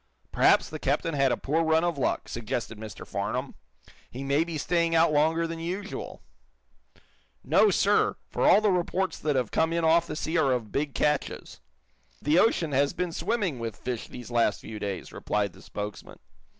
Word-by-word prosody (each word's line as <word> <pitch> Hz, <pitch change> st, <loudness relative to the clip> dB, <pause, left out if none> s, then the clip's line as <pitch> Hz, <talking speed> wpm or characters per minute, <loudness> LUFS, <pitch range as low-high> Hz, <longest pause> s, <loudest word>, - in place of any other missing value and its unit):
"Perhaps -, -, +4 dB
the -, -, -5 dB
captain 165 Hz, -2 st, 0 dB
had 135 Hz, -2 st, +2 dB
a -, -, 0 dB
poor 160 Hz, +4 st, 0 dB
run 160 Hz, 0 st, +3 dB
of 175 Hz, -1 st, 0 dB
luck," 135 Hz, -, -1 dB
suggested 115 Hz, -1 st, -4 dB
Mr. 110 Hz, -3 st, -8 dB
Farnum. -, -, -3 dB, 0.6 s
"He 130 Hz, +3 st, -7 dB
may 140 Hz, +3 st, +2 dB
be 165 Hz, -2 st, -5 dB
staying 170 Hz, +2 st, +1 dB
out 165 Hz, -1 st, +4 dB
longer 160 Hz, +3 st, +2 dB
than 165 Hz, 0 st, -5 dB
usual." 185 Hz, +5 st, -5 dB, 1.2 s
"No, 430 Hz, -, +4 dB
sir, -, -, +2 dB
for -, -, 0 dB
all -, -, +6 dB
the 210 Hz, -2 st, +3 dB
reports 180 Hz, 0 st, -1 dB
that 150 Hz, -2 st, 0 dB
have 125 Hz, -4 st, 0 dB
come 160 Hz, 0 st, +1 dB
in 170 Hz, -1 st, 0 dB
off 165 Hz, +1 st, +4 dB
the -, -, -5 dB
sea 160 Hz, +2 st, -1 dB
are 135 Hz, -4 st, +3 dB
of 115 Hz, -4 st, -3 dB
big 145 Hz, 0 st, -2 dB
catches. 150 Hz, -1 st, -1 dB, 0.6 s
The 150 Hz, +5 st, +3 dB
ocean 175 Hz, -8 st, +2 dB
has 140 Hz, +1 st, +2 dB
been 180 Hz, 0 st, -2 dB
swarming 185 Hz, -, -1 dB
with 115 Hz, -2 st, -4 dB
fish 125 Hz, -1 st, -5 dB
these 125 Hz, 0 st, -10 dB
last 115 Hz, -3 st, +1 dB
few 110 Hz, -1 st, -8 dB
days," 100 Hz, -2 st, -5 dB
replied 100 Hz, -3 st, -1 dB
the -, -, -16 dB
spokesman. 105 Hz, 0 st, -7 dB
155 Hz, 185 wpm, -27 LUFS, 125-170 Hz, 1.2 s, all